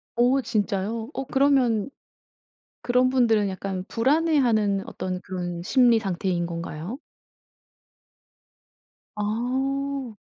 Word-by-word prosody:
오 250 +3 +3
진짜요? 220 0 -2
어 270 - -3
그러면 265 -4 +2 0.9
그런 250 +1 +3
분들은 225 -6 +3
약간 190 -1 -4
불안해하는 240 -7 +2
어떤 185 -1 -4
그런 175 -2 -5
심리 240 +3 +4
상태인 185 -3 -1
건가요? 170 - -6 2.2
아. 260 +3 -2
225 Hz, 190 characters per minute, -25 LUFS, 195-260 Hz, 2.2 s, 심리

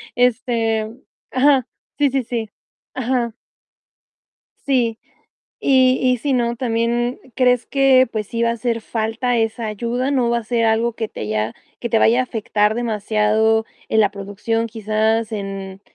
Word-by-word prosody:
Este 230 -3 +1 0.4
ajá, 265 -1 +3 0.3
sí, 285 - +4
sí, 270 -1 0
sí 225 -2 -4 0.5
Ajá. 245 -2 -1 1.3
Sí. 240 -5 +1 0.6
Y 260 -1 +4
y 255 -1 +3
si 280 +4 -1
no, 235 -2 +1
también, 240 +1 -1 0.2
¿crees 250 -2 +3
que 265 -2 +4
pues, 215 -2 -3
sí 230 +2 -3
va 230 - +3
a - - +1
hacer 230 0 -2
falta 225 +3 -1
esa 225 0 -1
ayuda? 235 +5 -2
¿No 255 -4 +2
va 235 - +2
a 235 - -7
ser 230 0 0
algo 225 +1 +2
que 225 -1 -3
te - - -10
haya 110 +1 -1 0.3
que 235 - -4
te 230 - +3
vaya 235 +3 +4
a - - +3
afectar 215 -2 0
demasiado 220 -1 +1 0.2
en 220 - +3
la 210 - +3
producción, 205 +3 -3
quizás 220 0 0
en 195 -2 -5
230 Hz, 155 wpm, -20 LUFS, 220-250 Hz, 1.3 s, sí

